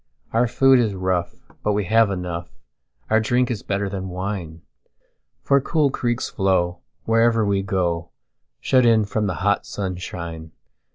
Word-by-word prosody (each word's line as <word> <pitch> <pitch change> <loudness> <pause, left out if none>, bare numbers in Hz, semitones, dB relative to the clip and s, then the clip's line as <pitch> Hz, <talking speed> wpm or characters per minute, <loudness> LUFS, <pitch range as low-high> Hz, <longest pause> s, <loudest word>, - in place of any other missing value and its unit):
Our 120 +2 +3
food 135 +2 +5
is 110 -5 0
rough, 90 -2 -1 0.3
but 105 - 0
we 105 0 0
have 110 +2 +4
enough; 90 -3 -4 0.6
Our 110 - +5
drink 120 +3 +1
is 110 - -3
better 100 0 -2
than 95 -1 -5
wine:For 95 - -4
cool 150 0 +1
creeks 120 -1 -1
flow 90 -3 0 0.2
wherever 115 0 +3
we 100 -1 +1
go, 90 -4 -1 0.5
Shut 130 -1 +3
in 115 -2 +4
from 105 +1 -1
the 90 - -2
hot 100 0 +2
sunshine. 85 -4 -6
100 Hz, 145 wpm, -22 LUFS, 90-115 Hz, 0.6 s, food